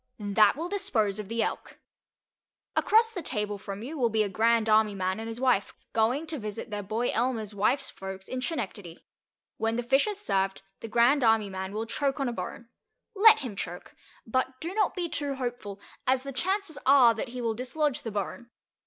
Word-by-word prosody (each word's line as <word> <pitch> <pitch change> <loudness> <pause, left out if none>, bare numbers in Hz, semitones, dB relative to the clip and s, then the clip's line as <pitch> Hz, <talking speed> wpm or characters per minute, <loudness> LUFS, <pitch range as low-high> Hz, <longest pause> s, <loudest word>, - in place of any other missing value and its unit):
That 205 0 +4
will 330 +3 -3
dispose 245 - 0
of 210 - -5
the 230 +2 0
Elk. - - -5 1.0
Across 450 +1 +4
the 365 - -4
table 210 -7 -2
from 200 +1 -7
you 295 +5 -6
will 240 -2 +3
be 220 -1 +2
a 205 - -2
Grand 225 +3 +2
Army 215 -1 +4
man 185 +1 -1
and 225 0 -5
his 225 +1 -6
wife, 250 -6 +1 0.2
going 240 +8 +1
to 315 -2 -4
visit 215 0 -6
their 205 0 -3
boy 220 +5 -1
Elmer's 225 -3 -1
wife's 210 +7 +1
folks 190 0 -8
in 255 - -4
Schenectady. 205 - -5 0.5
When 225 0 0
the 240 - -1
fish 270 - +3
is 415 -1 -3
served, 195 - -1 0.2
the - - -7
Grand 240 +5 +4
Army 225 -3 +3
man 190 0 -5
will 215 +2 -3
choke 275 +4 -1
on 275 - 0
a 240 - -2
bone. 235 0 -6 0.5
Let 435 0 +7
him 245 -7 -5
choke, 175 -2 -6 0.3
but 255 +2 -1
do 335 +3 -5
not 420 -2 +1
be 355 -2 -1
too 285 -3 -2
hopeful, 245 -6 -5 0.3
as 260 0 +2
the 275 0 -6
chances 375 +3 -1
are 260 -4 +7
that 225 +4 -4
he 250 +1 -7
will 230 -2 0
dislodge 260 +4 -1
the 225 - -5
bone. 210 +3 -4
235 Hz, 200 wpm, -28 LUFS, 210-275 Hz, 1.0 s, Let